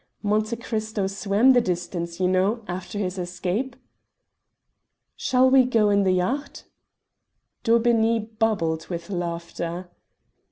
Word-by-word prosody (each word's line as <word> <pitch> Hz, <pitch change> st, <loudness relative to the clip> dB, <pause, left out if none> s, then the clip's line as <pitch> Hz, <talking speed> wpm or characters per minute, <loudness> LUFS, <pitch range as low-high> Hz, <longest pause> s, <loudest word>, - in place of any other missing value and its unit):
Monte 215 Hz, +2 st, +1 dB
Cristo 220 Hz, -3 st, -3 dB
swam 200 Hz, +6 st, +3 dB
the 245 Hz, -, +5 dB
distance, 175 Hz, -3 st, -3 dB
you 185 Hz, -, +2 dB
know, 195 Hz, +5 st, +1 dB
after 185 Hz, +3 st, -5 dB
his 190 Hz, -2 st, -2 dB
escape." 180 Hz, +8 st, -3 dB, 1.4 s
"Shall 255 Hz, 0 st, +3 dB
we 260 Hz, 0 st, +6 dB
go 225 Hz, -4 st, +2 dB
in 200 Hz, 0 st, +4 dB
the 185 Hz, -, +3 dB
yacht?" 245 Hz, +11 st, -2 dB, 1.0 s
Daubeney 230 Hz, -1 st, +3 dB, 0.2 s
bubbled 165 Hz, -8 st, 0 dB
with 170 Hz, +1 st, -6 dB
laughter. 170 Hz, 0 st, -4 dB
200 Hz, 115 wpm, -24 LUFS, 180-230 Hz, 1.4 s, we